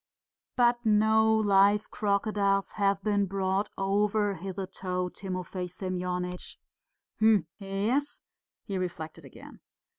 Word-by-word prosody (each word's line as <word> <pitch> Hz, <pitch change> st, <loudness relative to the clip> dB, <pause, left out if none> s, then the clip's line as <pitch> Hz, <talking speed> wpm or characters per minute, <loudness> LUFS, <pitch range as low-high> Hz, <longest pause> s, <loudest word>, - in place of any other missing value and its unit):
"But 240 Hz, -1 st, +3 dB
no 220 Hz, 0 st, +4 dB
live 205 Hz, -1 st, +3 dB
crocodiles 200 Hz, -1 st, +1 dB
have 200 Hz, -1 st, 0 dB
been 205 Hz, -1 st, +1 dB
brought 195 Hz, +1 st, -1 dB
over 205 Hz, +1 st, +1 dB
hitherto, 185 Hz, -1 st, -4 dB
Timofey 185 Hz, -1 st, -5 dB
Semyonitch." 180 Hz, -1 st, -4 dB, 0.6 s
"Hm... 215 Hz, -5 st, +4 dB
yes," 210 Hz, +9 st, -1 dB, 0.4 s
he 195 Hz, -3 st, -3 dB
reflected 170 Hz, -3 st, -5 dB
again. -, -, -13 dB
195 Hz, 95 wpm, -28 LUFS, 185-210 Hz, 0.6 s, no